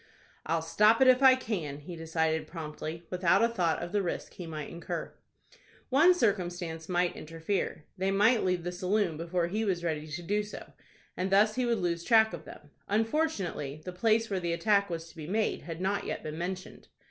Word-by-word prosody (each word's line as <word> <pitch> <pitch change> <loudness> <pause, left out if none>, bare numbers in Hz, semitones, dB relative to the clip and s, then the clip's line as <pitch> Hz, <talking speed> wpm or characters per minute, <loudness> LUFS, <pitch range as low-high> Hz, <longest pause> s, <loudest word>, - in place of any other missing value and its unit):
"I'll 165 0 0
stop 210 +7 +4
it 265 - +6
if 255 +1 +6
I 265 -1 +8
can," 180 - -4
he 170 +4 -8
decided, 160 -1 -1
promptly, 160 0 -6
without 180 +3 +3
a - - +5
thought 180 -9 0
of 175 - -6
the 205 - +1
risk 175 - -4
he 175 - -8
might 155 -2 -6
incur. 170 0 -5 0.8
One 320 +7 +6
circumstance 175 - -1
might 175 0 +1
interfere: 165 0 -3
they 190 +1 +1
might 210 +4 +4
leave 180 -2 0
the 175 - -3
saloon 185 0 0
before 170 +2 -1
he 210 +6 -1
was 185 -5 -1
ready 155 -2 -2
to 160 +3 -6
do 205 +4 0
so, 210 0 -9 0.4
and 185 +1 -2
thus 210 +2 +5
he 255 0 0
would 235 -1 +2
lose 170 -3 -1
track 220 -2 +5
of 160 -2 -7
them. 145 - -13 0.2
Unfortunately, 210 - -1
the 180 - -5
place 225 +4 +2
where 195 -3 -1
the 170 -1 -1
attack 200 +3 +2
was 165 -1 -4
to - - -17
be 155 -2 -8
made 215 +4 0
had 165 +1 -7
not 195 +2 0
yet - - -4
been 155 0 -5
mentioned. 185 +2 -5
180 Hz, 200 wpm, -30 LUFS, 165-210 Hz, 0.8 s, I